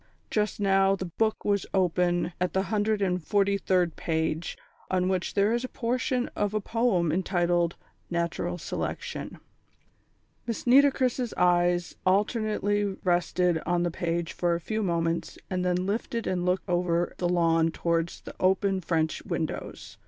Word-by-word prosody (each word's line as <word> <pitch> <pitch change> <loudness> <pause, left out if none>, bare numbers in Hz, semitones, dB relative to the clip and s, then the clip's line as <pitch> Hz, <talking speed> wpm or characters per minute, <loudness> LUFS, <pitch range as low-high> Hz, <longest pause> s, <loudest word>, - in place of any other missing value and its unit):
Just 210 -1 0
now 195 -1 +3
the 190 - -5
book 220 -1 +1
was 200 -2 +1
open 175 -1 +1
at 180 - 0
the 190 - +1
hundred 210 0 +1
and 180 -1 0
forty 200 +4 +2
third 180 -3 +1
page, 160 0 -2 0.3
on 185 0 +1
which 185 -2 -1
there 205 +2 +3
is 240 +1 0
a - - -2
portion 250 +1 -1
of 205 0 -1
a - - +2
poem 210 -6 +1
entitled 175 -1 +1 0.3
Natural 170 +1 -2
Selection. 170 - -5 1.1
Miss 230 - -3
Nitocris' 255 -2 +3
eyes 175 0 +2
alternately 205 +1 +1 0.2
rested 175 -1 +2
on 175 0 +2
the 175 - 0
page 170 0 -2
for 175 -1 +1
a - - -2
few 215 +6 -3
moments 170 -3 -1
and 185 -1 0
then 180 0 0
lifted 225 +3 -2
and 180 -1 -1
looked 185 +2 0
over 175 -1 +1
the 175 - +1
lawn 165 -2 +3
towards 170 0 -1
the - - -9
open 190 +1 +2
French 160 -2 0
windows. - - -5
180 Hz, 150 wpm, -27 LUFS, 175-205 Hz, 1.1 s, now